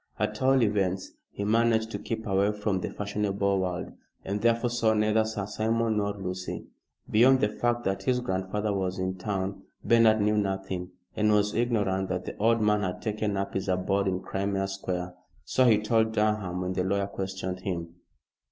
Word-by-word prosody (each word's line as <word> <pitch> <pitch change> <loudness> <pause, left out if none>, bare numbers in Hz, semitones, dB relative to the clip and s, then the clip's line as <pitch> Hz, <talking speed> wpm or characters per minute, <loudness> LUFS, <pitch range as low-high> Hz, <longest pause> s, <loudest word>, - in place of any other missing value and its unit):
At - - -2
all 130 -1 +4
events 95 -3 0 0.2
he 100 - -5
managed 110 +1 +2
to - - -4
keep 110 -1 -4
away 100 +1 +2
from 105 -2 -1
the - - -3
fashionable 100 -1 -1
world, 90 -1 -3 0.3
and 100 +2 -2
therefore 115 +1 +2
saw 115 -2 +2
neither 105 +1 +3
Sir 110 -2 -3
Simon 110 +1 0
nor 100 -1 0
Lucy. 90 -1 -5 0.5
Beyond 130 +4 +6
the 105 - +2
fact 120 +2 -1
that 95 0 -1
his 125 -1 +1
grandfather 100 0 -2
was 95 -1 -2
in 95 0 -2
town 95 0 -3 0.2
Bernard 115 -2 +5
knew 105 +1 +2
nothing, 95 -2 -3 0.3
and 105 0 +2
was 105 0 +2
ignorant 100 -5 0
that 90 0 -2
the - - -5
old 115 +2 +3
man 105 0 +3
had 90 -2 -3
taken 105 -2 -1
up 100 0 -2
his 95 - -2
abode 95 +2 +1
in 95 -1 -1
Crimea 95 +1 -1
Square. 90 -2 -4 0.3
So 130 - +3
he 110 -3 +6
told 110 +1 +1
Durham 105 -4 0
when 90 0 -2
the 90 0 0
lawyer 100 +1 0
questioned 95 -1 -4
him. 85 -3 -4
100 Hz, 180 wpm, -28 LUFS, 95-110 Hz, 0.5 s, Beyond